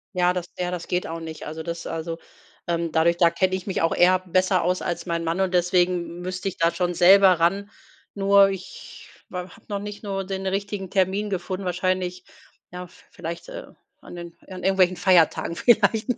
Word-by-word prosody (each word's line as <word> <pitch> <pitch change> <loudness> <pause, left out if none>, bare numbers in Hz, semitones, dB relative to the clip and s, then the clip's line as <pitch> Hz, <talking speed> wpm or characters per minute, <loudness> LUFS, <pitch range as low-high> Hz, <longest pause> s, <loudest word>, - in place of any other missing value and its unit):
Ja, 180 0 +3
das 180 -1 -4
ja, 180 0 -2
das 175 -2 -5
geht 180 0 -1
auch 165 +1 -5
nicht. 160 -1 -8
Also, 160 +1 -6
das 170 +1 -6
also, 165 0 -4 0.5
ähm, 170 -1 -1
dadurch 165 +2 +2
da 170 -1 +5
kenne 185 +2 0
ich 185 +1 -7
mich 195 - -1
auch 165 - +1
eher 185 +1 +5
besser 185 0 +1
aus 180 +2 0
als 170 0 -3
mein 170 -1 -2
Mann 165 +2 -2
und 190 -1 0
deswegen 180 0 +2 0.2
m 175 - -8
müsste 185 +1 -4
ich 190 - -4
da 165 0 +2
schon 175 -1 -1
selber 185 0 +6
ran. 195 +5 +1 0.5
Nur 200 0 +5
ich 190 -1 -9 0.2
habe 180 0 -5 0.2
noch 200 -1 -3
nicht 205 0 -7
nur 195 -1 -3
den 190 0 -4
richtigen 195 0 -3
Termin 195 +3 0
gefunden, 190 0 -4
wahrscheinlich, 180 0 -2 0.5
ja, 180 0 -7
v - - -21
vielleicht, 170 - -7
äh, - - -8 0.3
an - - -11
den 170 -1 -9
an 185 -1 -9
irgendwelchen 185 -1 +3
Feiertagen 175 -2 +3
vielleicht. 220 +1 +3
180 Hz, 195 wpm, -24 LUFS, 170-195 Hz, 0.5 s, selber